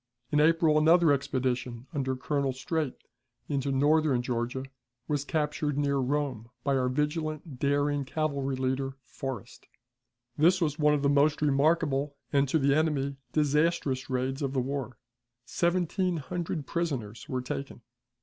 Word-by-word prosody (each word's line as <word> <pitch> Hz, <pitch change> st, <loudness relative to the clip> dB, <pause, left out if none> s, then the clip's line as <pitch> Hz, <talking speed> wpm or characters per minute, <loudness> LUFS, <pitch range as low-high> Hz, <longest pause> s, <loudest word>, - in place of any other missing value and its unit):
In 150 Hz, -, +3 dB
April 160 Hz, 0 st, +4 dB
another 165 Hz, +1 st, +5 dB
expedition, 130 Hz, -3 st, -1 dB
under 135 Hz, -3 st, -1 dB
Colonel 140 Hz, 0 st, -1 dB
Streight, 140 Hz, +2 st, -2 dB, 0.5 s
into 140 Hz, -1 st, -1 dB
northern 145 Hz, -1 st, +3 dB
Georgia, 125 Hz, +1 st, -2 dB, 0.4 s
was 145 Hz, -2 st, 0 dB
captured 150 Hz, -1 st, -1 dB
near 140 Hz, -1 st, +1 dB
Rome 130 Hz, -4 st, -1 dB
by 140 Hz, -1 st, +1 dB
our 130 Hz, -1 st, +1 dB
vigilant, 150 Hz, 0 st, -2 dB
daring 145 Hz, +1 st, +1 dB
cavalry 140 Hz, -2 st, -1 dB
leader, 130 Hz, +1 st, -1 dB
Forrest. 125 Hz, -1 st, -7 dB, 0.7 s
This 175 Hz, +5 st, +4 dB
was 155 Hz, -3 st, -1 dB
one 150 Hz, 0 st, +4 dB
of 145 Hz, -, -2 dB
the -, -, +4 dB
most 145 Hz, +2 st, +3 dB
remarkable, 145 Hz, -1 st, +2 dB, 0.2 s
and, 140 Hz, -1 st, +3 dB
to 160 Hz, -, +3 dB
the 140 Hz, -2 st, +3 dB
enemy, 140 Hz, -3 st, 0 dB, 0.2 s
disastrous 150 Hz, -3 st, +1 dB
raids 130 Hz, +2 st, -1 dB
of 135 Hz, -1 st, -1 dB
the 135 Hz, -, +1 dB
war. 130 Hz, -1 st, -3 dB, 0.5 s
Seventeen 180 Hz, +3 st, 0 dB
hundred 165 Hz, 0 st, -4 dB
prisoners 135 Hz, -9 st, -3 dB
were 130 Hz, -3 st, -2 dB
taken. 135 Hz, 0 st, -5 dB
140 Hz, 140 wpm, -29 LUFS, 130-155 Hz, 0.7 s, another